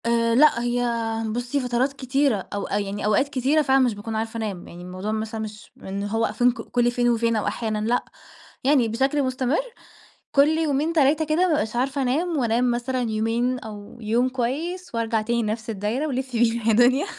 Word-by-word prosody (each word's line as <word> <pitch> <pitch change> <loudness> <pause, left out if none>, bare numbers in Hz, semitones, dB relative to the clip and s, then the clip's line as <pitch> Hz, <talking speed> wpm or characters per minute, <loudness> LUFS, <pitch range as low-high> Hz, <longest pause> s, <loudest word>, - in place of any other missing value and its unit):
آآ 230 0 +2
لأ، 270 -3 +5
هي 245 0 0 0.5
بُصّي، 245 +4 -2
فترات 250 +2 0
كتيرة 265 -5 0
أو 200 -1 -3
يعني 205 0 -2
أوقات 215 +7 +2
كتيرة 275 +3 +2
فعلًا 270 -2 +3
مش 250 -3 +3
باكون 210 +2 -6
عارفة 225 +1 -3
أنام. 205 -5 -4
يعني 175 - -11
الموضوع 185 +4 -5
مثلًا 220 0 -3
مش 215 -1 -8
إن 195 +1 -4
هو 225 +2 0
I - - -4
think 235 +1 +1
كل 240 +1 +1
فين 240 0 +1
وفين 230 -1 +1
أو 215 - -1
أحيانًا 220 -2 -2
لأ. 245 +1 +1 0.6
يعني 265 -3 +4
بشكل 270 +6 +1
مستمر 255 +2 0 0.7
كل 280 +1 +5
يومين، 315 0 0
3 305 0 +3
كده 310 0 0
ما 365 +1 +4
بابقاش 300 -10 0
عارفة 270 +3 0
أنام 310 +6 0
وأنام 240 -1 +2
مثلًا 245 +2 -1
يومين 230 +4 0
أو 210 0 -10
يوم 235 +4 +1
كويس 285 +7 -3
وأرجع 225 -1 0
تاني 235 +2 0
نَفْس 220 +1 -3
الدايرة 220 +8 -2
ولِفّي 260 -3 -2
بينا 230 -1 +1
يا 225 - +5
دُنيا. 250 - +4
240 Hz, 190 wpm, -24 LUFS, 220-270 Hz, 0.7 s, لأ